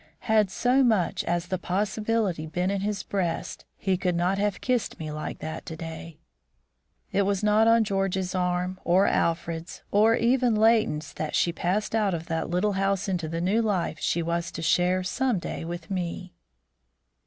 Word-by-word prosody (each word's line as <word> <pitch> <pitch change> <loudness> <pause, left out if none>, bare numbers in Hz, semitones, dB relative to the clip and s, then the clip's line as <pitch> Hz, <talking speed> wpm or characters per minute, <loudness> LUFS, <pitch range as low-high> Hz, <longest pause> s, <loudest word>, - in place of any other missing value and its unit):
Had 215 -4 +3
so 250 +7 +2
much 215 -8 +2
as 175 0 0
the 185 0 -3
possibility 205 -2 -1
been 180 +4 -1
in 200 -1 -1
his 205 -1 -2
breast, 185 -4 -3
he 190 -2 0
could 180 -1 0
not 180 +3 +1
have 205 -1 0
kissed 250 -3 -1
me 155 -1 -5
like 155 0 -5
that 160 0 -5
to 160 - -5
day." 165 0 -8 0.9
It 200 - +2
was 200 0 0
not 210 +1 +4
on 230 0 +5
George's 195 -2 -1
arm, 180 0 -1
or 185 +3 +4
Alfred's, 165 0 -1
or 220 +3 +5
even 240 0 +2
Leighton's 215 -9 +2
that 155 - -3
she 170 - +2
passed 190 +6 -1
out 210 -5 +2
of 165 0 -6
that 165 -1 -2
little 180 +4 +1
house 195 0 0
into 180 -4 -1
the 165 +1 -3
new 200 +6 +2
life 190 -8 -1
she 170 +2 0
was 170 +1 -2
to 165 - -5
share 180 +3 +2
some 250 +5 0
day 170 - -5
with 175 +4 -6
me. 180 0 -4
185 Hz, 175 wpm, -26 LUFS, 170-210 Hz, 0.9 s, on